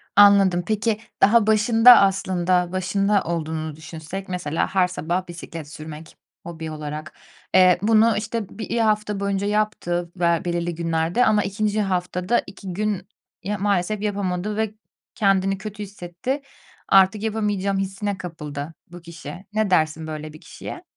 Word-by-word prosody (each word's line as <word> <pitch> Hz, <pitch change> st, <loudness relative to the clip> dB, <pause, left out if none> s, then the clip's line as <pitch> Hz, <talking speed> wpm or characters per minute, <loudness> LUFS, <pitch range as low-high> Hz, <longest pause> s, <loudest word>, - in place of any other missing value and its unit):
Anladım. 195 Hz, -3 st, +6 dB
Peki, 215 Hz, 0 st, 0 dB, 0.2 s
daha 215 Hz, +1 st, +5 dB
başında 225 Hz, +3 st, +7 dB
aslında, 185 Hz, -2 st, +1 dB
başında 195 Hz, +2 st, +1 dB
olduğunu 160 Hz, -2 st, -3 dB
düşünsek 160 Hz, +4 st, -8 dB
mesela 175 Hz, -4 st, -1 dB
her 185 Hz, -1 st, +4 dB
sabah 180 Hz, +1 st, -3 dB
bisiklet 165 Hz, -2 st, -8 dB
sürmek 155 Hz, +1 st, -10 dB, 0.3 s
hobi 160 Hz, -2 st, -7 dB
olarak. 155 Hz, 0 st, -6 dB, 0.4 s
Eee, 185 Hz, -1 st, +6 dB
bunu, 220 Hz, +1 st, +4 dB
işte, 220 Hz, -1 st, -3 dB
1 225 Hz, +2 st, -4 dB
hafta 210 Hz, -2 st, +1 dB
boyunca 200 Hz, 0 st, -1 dB
yaptı 205 Hz, -5 st, -1 dB
ve 170 Hz, -2 st, +1 dB
belirli 175 Hz, -1 st, -2 dB
günlerde 165 Hz, +6 st, +1 dB
ama 210 Hz, -1 st, +3 dB
2. 210 Hz, +1 st, -1 dB
haftada 180 Hz, +2 st, 0 dB
2 190 Hz, -1 st, -8 dB
gün 200 Hz, -1 st, -2 dB, 0.4 s
ya 205 Hz, +3 st, -2 dB
maalesef 200 Hz, +1 st, 0 dB
yapamadı 205 Hz, -1 st, -2 dB
ve 220 Hz, -1 st, -1 dB, 0.4 s
kendini 195 Hz, -1 st, +2 dB
kötü 210 Hz, +1 st, -7 dB
hissetti. 200 Hz, +7 st, -5 dB, 0.5 s
Artık 195 Hz, +2 st, +5 dB
yapamayacağım 205 Hz, -3 st, -1 dB
hissine 195 Hz, +1 st, -2 dB
kapıldı 150 Hz, -4 st, -6 dB, 0.2 s
bu 175 Hz, 0 st, -10 dB
kişi. 170 Hz, +1 st, -10 dB
Ne 215 Hz, -1 st, +1 dB
dersin 160 Hz, -2 st, +1 dB
böyle 155 Hz, 0 st, -6 dB
bir 155 Hz, -, -13 dB
kişiye? -, -, -9 dB
190 Hz, 135 wpm, -23 LUFS, 170-210 Hz, 0.5 s, başında